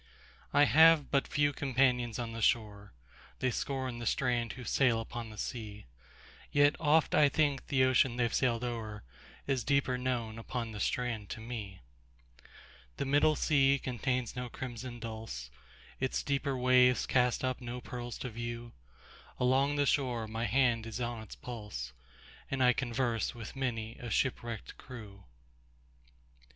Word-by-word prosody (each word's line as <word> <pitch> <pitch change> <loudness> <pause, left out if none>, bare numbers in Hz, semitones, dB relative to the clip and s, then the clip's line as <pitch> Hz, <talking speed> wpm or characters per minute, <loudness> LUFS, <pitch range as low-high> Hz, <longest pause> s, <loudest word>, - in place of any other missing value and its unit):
I 145 - +5
have 160 0 +6
but 140 -1 +2
few 145 -1 +1
companions 125 -4 +1
on 120 -2 -3
the 115 0 -6
shore:They 105 - -2
scorn 130 -1 -3
the 120 - -4
strand 120 -3 0
who 130 - -9
sail 120 -2 +2
upon 115 0 -6
the 110 - -11
sea; 105 -4 -5 0.7
Yet 145 0 +4
oft 155 -1 +3
I 150 -2 +6
think 145 -3 +1
the 135 -3 +3
ocean 130 -1 +3
they've 120 -2 0
sailed 120 -2 +1
o'erIs 115 - -5
deeper 130 -2 +1
known 120 -3 -2
upon 115 0 -4
the 105 - -7
strand 115 -2 -1
to - - -5
me. 110 -5 -7 1.2
The 140 - -1
middle 145 +3 +4
sea 140 -2 +3
contains 125 -1 -2
no 125 0 -4
crimson 120 0 -6
dulse, 110 - -6 0.5
Its 130 0 -1
deeper 140 -1 -1
waves 125 0 +4
cast 125 -1 +2
up 130 0 -1
no 120 0 -5
pearls 120 -1 -6
to 125 - -4
view; 120 +1 -5 0.7
Along 135 +3 +3
the 145 0 +2
shore 125 -5 +1
my 110 +2 -3
hand 120 0 +2
is 115 +1 -5
on 120 -2 -3
its 110 - -10
pulse, 105 - -7 0.6
And 135 -1 0
I 125 0 +6
converse 120 -2 -1
with 115 +1 -8
many 115 -4 -3
a 120 - -6
shipwrecked 120 -2 -2
crew. 105 -6 -11
125 Hz, 145 wpm, -32 LUFS, 115-130 Hz, 1.2 s, have